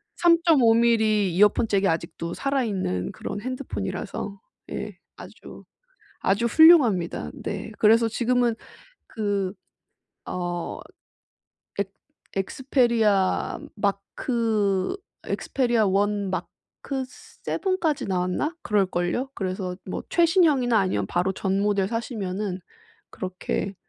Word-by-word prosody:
3.5 330 -9 +5
밀리 220 -4 +3
이어폰 210 +4 +4
잭이 200 -2 +2
아직도 165 0 -2
살아 275 -1 0
있는 185 - -2
그런 205 - -6
핸드폰이라서 255 -5 -5 0.3
예. - - -5 0.2
아주, - - -12 0.6
아주 200 +5 +1
훌륭합니다. 240 - +5
네. - - -5
그래서 225 +2 +5
지금은 240 0 +1 0.5
그 200 -4 -2 0.7
어 175 -1 -4 1.0
엑 200 -1 -1 0.4
Xperia 220 -2 +1 0.2
mark 200 -1 +1 1.3
Xperia 240 -4 0
1 200 +1 +1
mark - - -2 1.0
7 375 -1 -1
까지 310 -5 0
나왔나? 185 - -1
그럴 205 -2 +2
걸요. 180 +9 -2
그래서 185 -1 -3
뭐 185 - -5
최신형이나 320 - +4
아니면 185 - 0
바로 180 +2 0
전 195 0 -1
모델 200 -2 +1
사시면은 205 -4 -3 0.5
그렇게 185 +1 -4
210 Hz, 240 characters per minute, -25 LUFS, 190-245 Hz, 1.3 s, 3.5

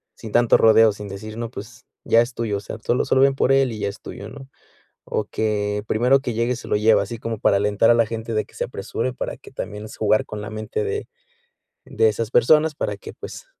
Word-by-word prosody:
sin 110 - -9
tanto 120 -1 +5
rodeo, 110 0 +6
sin 105 0 -8
decir, 110 +3 -8
no, 115 -1 -4
pues, 110 -1 -10 0.2
ya 115 - +4
es 120 +1 -3
tuyo, 110 -4 -1
o - - -4
sea, 110 - -7
tú 115 - 0
lo - - +1
solo 130 - +3
ven 135 0 +4
por 135 - +2
él 135 -2 +3
y 110 - -6
ya 100 - -1
es 100 - -10
tuyo, - - -8
¿no? 135 -1 -11 0.6
O - - -2
que 105 -1 -1
primero 125 +5 +3
que 120 - -3
llegue 115 +2 0
se - - -10
lo - - +1
lleve, 110 +1 +4
así 105 +4 -5
como 115 -2 -4
para 100 - +3
alentar 105 +2 +2
a 120 - +5
la 115 - +3
gente 115 0 -5
de 110 - 0
que - - -22
se - - -2
apresure, 115 +3 -4
para - - -5
que, - - -15
también, 105 +1 -6
jugar 110 0 +2
con 105 -1 -7
la 105 - -6
mente 110 - -3
de 425 0 -3 0.8
de 110 - +2
esas 110 +1 -2
personas 150 +6 +4
para - - -2
que, - - -10
pues, - - -9
115 Hz, 245 wpm, -22 LUFS, 105-120 Hz, 0.8 s, rodeo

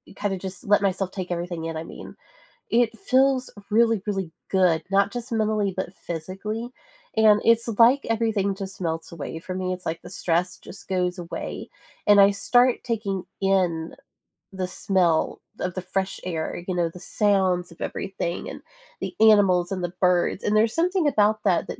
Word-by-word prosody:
kinda 200 -2 -2
just 190 0 -7
let 205 0 +4
myself 195 -1 0
take 185 -2 -5
everything 175 -1 -3
in, 165 -1 -4
I 160 - -4
mean. - - -10 0.6
It 235 0 +2
feels 265 -6 +2 0.2
really, 225 -1 +3
really 195 -5 -2 0.2
good, 180 -4 +3
not 200 +1 +3
just 245 0 -5
mentally, 215 -3 0
but 190 -1 -3
physically. 195 +8 -5 0.5
And 215 -1 +6
it's 230 +1 +4
like 250 +4 +6
everything 220 -3 +1
just 195 0 -7
melts 165 -1 -3
away 160 0 -6
for 185 +2 -6
me. 185 0 -2
It's 180 0 -8
like 165 +1 -3
the - - -9
stress 180 -1 -1
just 195 - -11
goes 180 -1 0
away, 170 -1 -6 0.4
and 205 -1 +7
I 200 0 +7
start 245 +5 +3
taking 205 -6 -2 0.2
in 180 -4 +1 0.6
the 185 -1 -3
smell 180 -3 +1 0.2
of 180 - -2
the 185 - -4
fresh 190 +1 -3
air, 170 -1 -4
you 185 - -1
know, 175 -1 +1
the 180 - -10
sounds 190 -2 +1
of 170 - -16
everything, 175 -3 -4
and - - -8 0.4
the - - -4
animals 195 -5 +5
and 185 -2 -3
the 175 0 -3
birds. 180 +1 +2
And 210 - +1
there's 220 +1 +3
something 350 0 +2
about 215 -5 +2
that 185 -4 +2
that - - -6
195 Hz, 175 wpm, -24 LUFS, 180-215 Hz, 0.6 s, and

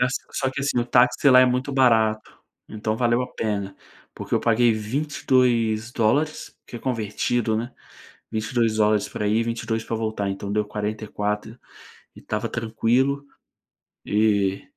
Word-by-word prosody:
As 125 +1 +2 0.2
só 130 -2 -1
que, 135 +1 -5
assim, 140 -3 0
o 120 - +1
táxi 125 +3 +4
lá 125 0 +8
é 130 - +6
muito 130 +3 -1
barato, 110 -5 +2 0.3
então 110 0 -3
valeu 120 0 +2
a 125 - -3
pena, 100 -3 -3 0.4
porque - - -4
eu - - +2
paguei 115 +1 +3
22 120 -2 0
dólares, 145 +8 0
que 120 - -8
convertido 115 -1 -1
né, 120 +3 -4 0.6
22 110 0 0
dólares 105 -1 +2
pra 105 - -3
ir, 110 +2 +2
22 115 -1 -2
pra 115 - -3
voltar, 110 -3 -2
então 100 +1 -5
deu 105 0 +1
44 105 +1 -4 0.6
e - - -12
estava 110 +2 -3
tranquilo. 120 +5 0 0.8
E 100 -2 +1
115 Hz, 145 wpm, -23 LUFS, 110-125 Hz, 0.8 s, lá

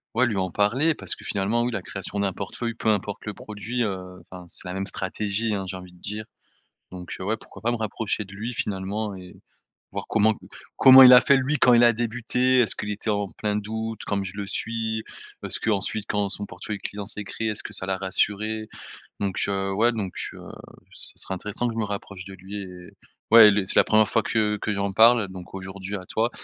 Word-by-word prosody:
ouais 125 +2 +4
lui 105 -4 -2
en 95 -1 -1
parler. 125 - +2
Parce - - -4
que - - -14
finalement, 105 +4 0
oui, 120 - -1
la 100 - -3
création 95 +2 -5
d'un 100 -1 +1
portefeuille 115 +5 -4
peu 110 - -1
importe 105 -1 -1
le 105 - -4
produit, 110 +5 -5
heu, 90 -3 -5
enfin 90 -1 -9
c'est - - -9
la 90 - -4
même 95 +1 -3
stratégie, 105 +3 -1
hein, 95 - -3
j'ai 95 - -5
envie 90 -1 -12
de - - -18
dire. 105 +1 -5 0.7
Donc, 90 -1 -7
heu, - - -5
ouais 110 +3 -1
pourquoi 100 - -14
pas 120 - +2
me 120 - -1
rapprocher 110 -1 -2
de 100 - -13
lui 115 +4 -4
finalement 100 +1 -3
et 90 -1 -11 0.6
voir - - -4
comment 110 +1 +4 0.4
comment 130 0 +10
il 125 -1 +10
a 125 - +10
fait 140 - +4
lui, 135 +3 0
quand 125 - +6
il 120 0 +6
a 120 - +6
débuté. 125 +2 +1
Est-ce 115 - +3
qu'il 105 - -4
était 105 +1 -2
en 100 -1 0
plein 105 +2 -2
doute 110 +1 -4
comme 100 -1 -1
je 95 +1 -6
le 100 - -3
suis? 110 -1 -2 0.4
Est-ce-qu'ensuite, 105 0 -1
quand 105 -1 0
son 100 +1 -4
portefeuille 100 +3 -6
client 100 +1 -6
s'est 105 -1 -5
créé, 110 +3 -3
est-ce 105 - -3
que - - -8
ça - - -1
l'a 95 0 0
rassuré? 105 +3 -1 0.5
Donc, 95 -2 -1
heu, 95 0 -1
ouais, 115 +4 +3
donc, 100 -5 -3 0.2
heu, - - -11 0.5
ce - - -8
serait 95 - -3
intéressant 105 +6 -2
que - - -4
je - - -2
me 110 - 0
rapproche 100 -2 -6
de 95 - -9
lui 95 +3 -8
et, 90 -2 -11 0.4
ouais, 115 -2 +10
les 100 -1 +1
c'est - - 0
la - - +8
1re 110 -1 +4
fois 115 - +2
que 105 -1 +1
que 110 - -1
j'en 100 0 -1
parle 115 0 +6
donc 95 0 -10
aujourd'hui 95 +1 -6
à 95 - -7
toi 110 +5 0
105 Hz, 225 wpm, -25 LUFS, 95-115 Hz, 0.7 s, comment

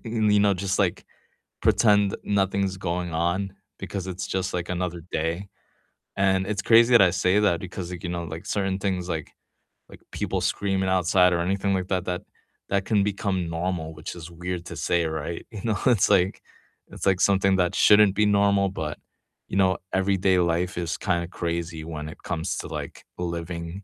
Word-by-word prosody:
you 110 -3 +2
know, 100 -1 +4
just, 95 +2 -2
like, 95 -4 0 0.6
pretend 105 -3 +4
nothing's 95 -1 0
going 90 -1 -3
on 90 +4 0 0.3
because 95 -1 -5
it's 95 0 -4
just, 95 -1 -1
like, 85 -1 -2
another 90 -2 -3
day, 85 +5 -2 0.7
and 95 -1 +2
it's 100 -2 -1
crazy 115 +3 +5
that - - +4
I 90 - +5
say 90 +3 +2
that 95 -5 +2
because, 90 -1 -6
like, 90 -1 -7
you 85 - -3
know, 85 -1 -3
like, 80 - -8
certain 95 -1 -1
things, 95 -2 -2
like 80 -3 -4 0.6
like, - - -14
people - - -2
screaming 95 -1 0
outside 90 0 +4
or 85 - +1
anything 95 +2 0
like 95 -1 -2
that 95 -2 -1
that 90 +1 -2 0.5
that 100 0 0
can 105 -3 +2
become 95 -3 -1
normal, 85 -1 -3
which 75 +2 -7
is 85 0 -9
weird 90 0 -5
to - - -7
say, 85 -1 +1
right? 80 +1 -4
You 105 - -7
know, 110 -4 0
it's, 115 -6 +4
like 95 -1 +2 0.5
it's - - -6
like 95 -2 +3
something 95 -1 +3
that 90 -1 +1
shouldn't 105 -2 +6
be 105 - +3
normal, 100 -1 +3
but, 80 -5 -4 0.5
you 95 - -2
know, 95 -2 +3 0.2
everyday 95 -1 +2
life 90 +2 0
is 85 -1 -2
kind 85 -2 0
of 85 - -8
crazy 85 -1 -3
when 80 -1 -6
it - - -13
comes 80 -2 -3
to, - - -5
like, - - -7 0.2
living 85 +1 -5
95 Hz, 185 wpm, -25 LUFS, 85-100 Hz, 0.7 s, shouldn't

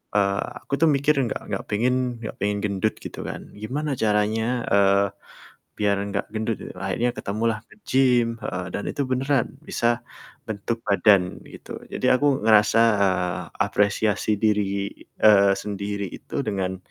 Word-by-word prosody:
eee, 100 -1 +2 0.2
aku - - -9
tuh 165 - +6
mikir 140 +2 +2 0.2
gak - - -4
gak - - -2
pengen 125 +2 0
gak 110 - -6
pengen 105 0 0
gendut 100 +1 0
gitu - - -7
kan. - - -6
Gimana 135 +8 -3
caranya, 110 +3 +1
eee, 100 0 +4 0.7
biar 100 -1 +2 0.2
gak 100 - -1
gendut 110 0 -1
gitu. - - -8
Akhirnya 100 +6 0
ketemulah 110 +2 -1
nge-gym 125 - +1
heeh. 90 0 -3
Dan 100 - -3
itu 145 - -3
beneran 130 0 +1 0.2
bisa 120 0 0 0.5
bentuk 110 +2 -3
badan 100 -2 +4
gitu. - - -9
Jadi - - -3
aku 140 0 +3
ngerasa, 110 +1 +5 0.2
eee, 90 -1 0 0.2
apresiasi 105 +1 +1
diri, 100 -2 +1 0.3
eee, 100 -2 +6
sendiri 100 0 -4
itu - - -5
dengan 95 -3 -2
105 Hz, 140 wpm, -24 LUFS, 100-120 Hz, 0.7 s, tuh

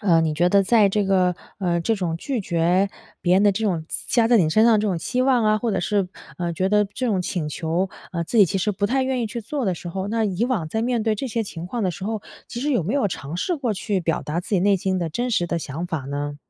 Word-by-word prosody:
呃， 175 -6 +4
你 160 -1 0
觉 175 +4 +3
得 200 +1 +4
在 210 0 +4
这 205 +1 +1
个 185 -2 +3 0.2
呃， 175 -3 0
这 225 +7 +1
种 170 -4 -2
拒 255 +6 -3
绝 180 +2 +1 0.3
别 175 0 +3
人 195 - +4
的 205 - +6
这 220 +3 -2
种 175 -6 0 0.2
加 235 -2 +3
在 240 - +6
你 165 -6 +4
身 215 +7 +4
上 235 - +6
的 215 - +4
这 210 - 0
种 180 -4 0
期 250 +9 -1
望 255 -3 +3
啊， 215 0 +3
或 235 +1 -1
者 - - 0
是， 200 -3 0 0.3
呃， 175 -1 -2
觉 185 +3 0
得 210 0 +3
这 225 +6 -4
种 195 -5 +1
请 170 -4 -2
求， 165 +5 -1 0.2
呃， 170 -1 -1
自 230 - -3
己 205 - +8
其 195 +2 -1
实 205 +3 0
不 200 +2 -2
太 265 +4 +1
愿 260 -2 -1
意 - - -1
去 225 +2 -5
做 255 +5 -3
的 185 -4 +1
时 175 - -8
候， 190 +3 -3
那 225 +1 0
以 195 +2 0
往 220 -11 -1
在 220 +5 -1
面 240 -1 0
对 220 0 +1
这 240 +6 -4
些 230 0 -1
情 170 -5 -7
况 235 +4 -3
的 185 - +1
时 180 +3 -7
候， 215 -1 -3 0.2
其 240 - -6
实 290 +1 0
有 235 - +2
没 195 +9 -2
有 275 -8 +2
尝 145 0 -6
试 350 - 0
过 245 -6 -1
去 200 0 -1
表 165 -2 0
达 150 +3 -3
自 - - -11
己 195 -4 +2
内 200 +1 +4
心 190 0 -1
的 170 - -1
真 245 +10 -2
实 175 -6 +1
的 170 0 -1
想 160 +3 -5
法 160 -4 -3
呢？ 145 +2 -4
195 Hz, 315 characters per minute, -23 LUFS, 175-225 Hz, 0.3 s, 己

